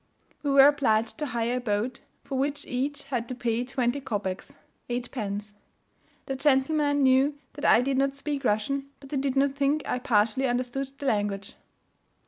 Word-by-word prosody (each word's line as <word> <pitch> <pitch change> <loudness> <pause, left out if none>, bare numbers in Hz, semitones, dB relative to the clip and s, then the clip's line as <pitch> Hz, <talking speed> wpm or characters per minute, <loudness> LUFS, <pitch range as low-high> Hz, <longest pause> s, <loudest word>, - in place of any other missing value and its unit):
We 290 - -2
were 275 0 +8
obliged 230 -5 +1
to 300 - -1
hire 235 0 -1
a - - -3
boat, 225 +2 -1 0.2
for 275 - -5
which 285 +2 -1
each 280 +3 -2
had 245 -4 -3
to 255 - -4
pay 240 -1 -1
twenty 255 +1 -1
kopecs 200 -7 -4 0.4
(8d.) 210 -4 -4 0.7
The 270 - -3
gentlemen 285 +1 +2
knew 265 +2 +4 0.2
that 290 - -5
I 230 - +6
did 270 0 0
not 275 0 +1
speak 280 0 -3
Russian 270 +6 0
but 275 - -13
they 285 - -2
did 270 0 -1
not 275 0 +3
think 285 +2 +1
I 250 - -1
partially 235 +1 +2
understood 250 +2 -2
the 285 - -7
language. 205 -5 -1
265 Hz, 170 wpm, -27 LUFS, 235-280 Hz, 0.7 s, were